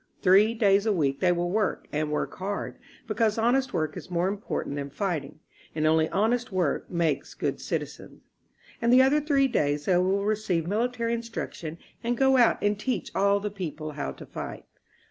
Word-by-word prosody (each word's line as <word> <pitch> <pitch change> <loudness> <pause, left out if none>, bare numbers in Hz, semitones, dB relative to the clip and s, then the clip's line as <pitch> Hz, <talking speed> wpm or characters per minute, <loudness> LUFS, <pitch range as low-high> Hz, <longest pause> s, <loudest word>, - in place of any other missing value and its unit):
Three 205 +4 +5
days 205 -1 +3
a - - +4
week 140 -8 0
they 180 - +3
will 175 0 -1
work 210 +1 0
and 150 0 -1
work 150 - -2
hard, 200 +2 -4 0.3
because 220 0 0
honest 250 +4 +2
work 155 -2 -1
is - - -8
more 175 0 0
important 195 -7 -3
than 140 0 -4
fighting, 155 -2 -3 0.3
and 155 -1 0
only 160 0 +3
honest 230 +4 0
work 180 -6 -1
makes 165 -5 -1
good - - -2
citizens. - - -5 0.6
And 235 0 +3
the 255 +1 +7
other 290 +3 +3
three 280 -2 +3
days 145 - 0
they 180 - +3
will 190 +2 +1
receive 205 -6 0
military 230 +4 -1
instruction 230 -8 -5 0.3
and 240 +1 0
go 265 +1 +4
out 240 -2 +5
and 205 0 +1
teach 255 +4 -2
all 200 +1 +3
the 205 0 -4
people 155 -6 -5
how 70 - -4
to - - -11
fight. - - -7
200 Hz, 185 wpm, -27 LUFS, 160-230 Hz, 0.6 s, the